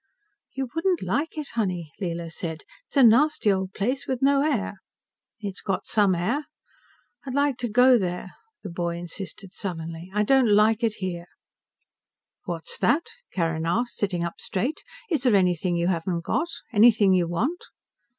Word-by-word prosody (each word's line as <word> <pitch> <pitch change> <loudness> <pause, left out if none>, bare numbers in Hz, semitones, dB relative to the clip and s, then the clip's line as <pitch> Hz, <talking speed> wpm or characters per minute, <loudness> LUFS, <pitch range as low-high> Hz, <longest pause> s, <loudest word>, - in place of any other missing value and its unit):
"You 265 -1 -2
wouldn't 345 +2 0
like 315 +3 -1
it, 300 -2 -4
honey," 180 -8 -2
Leela 170 -2 -3
said. 160 -1 -5 0.2
"It's - - -6
a 270 - +7
nasty 235 -2 +5
old 190 0 -3
place 250 +7 -1
with 260 -2 -1
no 275 0 +4
air." 225 -9 -1 0.6
"It's 200 -2 -4
got 195 -2 -2
some 200 -4 +3
air. 235 - -1 0.8
I'd 265 -2 -5
like 285 -2 +2
to 245 -2 -3
go 245 +2 +6
there," 180 -1 -3 0.3
the 195 - -6
boy 170 0 -2
insisted 190 +2 -6
sullenly. 165 -2 -5
"I 210 +1 +1
don't 260 +1 +4
like 215 +2 +4
it 220 -2 +1
here." 175 -2 -5 1.2
"What's 165 -2 -5
that?" 320 +4 +2 0.2
Carrin 165 -2 -1
asked, 235 +8 0
sitting 185 -4 -1
up 170 0 -5
straight. 245 +11 -2 0.3
"Is 310 - +1
there 250 -5 +4
anything 180 -2 +2
you 170 0 0
haven't 170 -1 -1
got? 325 - 0 0.3
Anything 215 -3 +6
you 180 -2 +2
want?" 240 - -1
200 Hz, 160 wpm, -25 LUFS, 175-250 Hz, 1.2 s, a